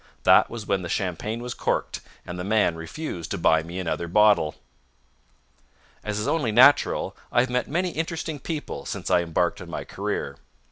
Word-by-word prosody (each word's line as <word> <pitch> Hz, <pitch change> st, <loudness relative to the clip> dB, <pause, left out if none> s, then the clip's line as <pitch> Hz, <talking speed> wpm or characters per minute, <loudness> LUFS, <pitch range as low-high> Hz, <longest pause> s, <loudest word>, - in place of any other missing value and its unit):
That -, -, +6 dB
was 115 Hz, -2 st, -7 dB
when 95 Hz, -1 st, 0 dB
the 85 Hz, -, -6 dB
champagne 105 Hz, +6 st, -2 dB
was 125 Hz, 0 st, -4 dB
corked, -, -, -2 dB, 0.2 s
and 90 Hz, 0 st, -6 dB
the -, -, -3 dB
man 105 Hz, -4 st, +2 dB
refused 85 Hz, -, -6 dB
to -, -, -2 dB
buy 80 Hz, -1 st, +3 dB
me 85 Hz, +3 st, -8 dB
another 85 Hz, -1 st, -2 dB
bottle. 100 Hz, -4 st, +4 dB, 1.5 s
As 105 Hz, -1 st, -3 dB
is 105 Hz, -, -2 dB
only 145 Hz, -9 st, +1 dB
natural, 130 Hz, +6 st, +5 dB, 0.2 s
I 120 Hz, -, +4 dB
have 125 Hz, 0 st, -2 dB
met 125 Hz, 0 st, 0 dB
many 175 Hz, +4 st, -1 dB
interesting 160 Hz, -2 st, -3 dB
people 155 Hz, +2 st, -5 dB
since -, -, -4 dB
I 90 Hz, -, +5 dB
embarked 85 Hz, +1 st, -1 dB
on -, -, -9 dB
my -, -, -4 dB
career. -, -, -4 dB
105 Hz, 180 wpm, -25 LUFS, 85-130 Hz, 1.5 s, That